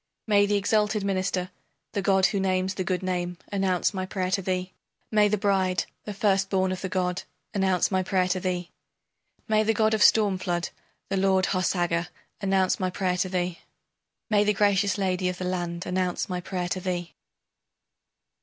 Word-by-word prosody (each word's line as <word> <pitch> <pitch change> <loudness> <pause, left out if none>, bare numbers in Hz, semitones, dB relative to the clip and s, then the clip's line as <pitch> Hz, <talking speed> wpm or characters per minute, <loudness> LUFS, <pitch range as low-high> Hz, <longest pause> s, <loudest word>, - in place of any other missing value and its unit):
May 205 -2 +4
the 205 - +1
exalted 210 +1 +1
minister, 185 -1 -1 0.4
the 200 - -1
god 190 0 +3
who 200 - +1
names 190 0 0
the 190 - -3
good 185 +1 -2
name, 180 -1 -2
announce 190 -1 +1
my 190 -1 -2
prayer 185 -1 -2
to 195 +1 +1
thee! 185 0 -2 0.4
May 210 -1 +5
the 210 +1 +1
bride, 190 -2 +1 0.2
the 210 - -4
first 195 -1 +2
born 190 -1 +1
of 185 - -4
the 190 - -3
god, 180 -2 -1 0.3
announce 190 -3 +1
my 190 -1 +2
prayer 185 0 +1
to 185 - 0
thee! 180 -1 -3 0.8
May 215 -1 +3
the 220 +1 +1
god 220 0 +3
of 215 - +1
storm 205 -4 +5
flood, 175 -1 -2 0.4
the 195 - 0
lord 190 -1 +3
Harsaga, 175 -2 0 0.3
announce 190 -2 +2
my 185 - 0
prayer 180 0 -1
to 185 +1 0
thee! 180 -1 -2 0.7
May 210 -2 +3
the 210 0 +2
gracious 200 -1 +2
lady 185 -2 0
of 180 - -4
the 185 - -4
land 175 -1 -3
announce 180 0 -1
my 180 -2 -3
prayer 180 -1 -3
to 185 - -1
thee! 175 -2 -3
185 Hz, 180 wpm, -26 LUFS, 180-200 Hz, 0.8 s, May